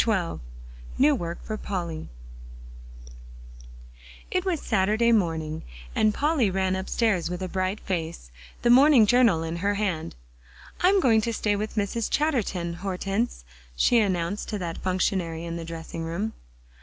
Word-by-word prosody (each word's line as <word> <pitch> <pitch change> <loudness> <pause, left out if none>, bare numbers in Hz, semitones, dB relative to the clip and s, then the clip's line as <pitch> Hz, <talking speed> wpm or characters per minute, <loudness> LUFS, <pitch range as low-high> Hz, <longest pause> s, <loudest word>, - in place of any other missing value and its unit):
XII 190 -7 0 0.6
NEW 290 +3 +5
WORK 170 -9 -4
FOR 215 - -4
POLLY 170 -6 -4 2.2
It 370 -1 +1
was 360 -5 0
Saturday 215 +4 +2
morning, 160 -7 0 0.3
and 215 - +3
Polly 285 -3 +1
ran 190 0 0
upstairs 190 -1 0
with 180 +1 -4
a - - -2
bright 185 +2 -2
face, 165 - -4 0.3
the 240 - +5
morning 265 -2 +7
Journal 225 -8 +4
in 165 +1 -3
her 200 +3 0
hand. 180 - -2 0.7
"I'm 380 +2 +5
going 225 -6 +4
to 230 - -1
stay 210 -2 0
with 215 +2 -4
Mrs. 215 +2 -1
Chatterton, 215 - 0
Hortense," 195 - -2 0.3
she 235 - +4
announced 190 -1 -1
to 210 - -2
that 170 -4 -4
functionary 180 -3 -1
in 170 0 -4
the 165 -1 -5
dressing 165 0 -7
room. 175 +7 -3
195 Hz, 145 wpm, -26 LUFS, 170-225 Hz, 2.2 s, morning